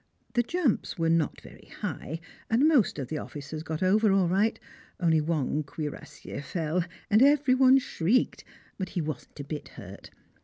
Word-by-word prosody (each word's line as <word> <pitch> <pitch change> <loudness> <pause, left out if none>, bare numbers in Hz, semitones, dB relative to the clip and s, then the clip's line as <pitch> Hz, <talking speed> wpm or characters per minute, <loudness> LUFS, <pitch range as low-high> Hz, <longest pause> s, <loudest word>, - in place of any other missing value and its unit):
The 240 - +3
jumps 290 - -1
were 165 -1 +2
not 165 -3 +1
very - - -15
high, 160 +3 -4 0.3
and 245 +7 +4
most 280 - +3
of 135 -4 -4
the 155 - -2
officers 150 +1 -7
got 160 +1 -3
over 210 +3 +4
all 195 -2 +3
right, 200 +6 +1 0.4
only 165 -3 +3
one 150 -2 0
cuirassier 150 -1 -7
fell, 165 +2 -1 0.3
and 215 +3 +6
every 280 -1 +5
one 260 0 +6
shrieked, 245 -2 0 0.4
but 190 - -3
he - - -3
wasn't 155 0 -6
a - - -4
bit 145 +1 -6
hurt. - - -10
175 Hz, 165 wpm, -28 LUFS, 155-230 Hz, 0.4 s, and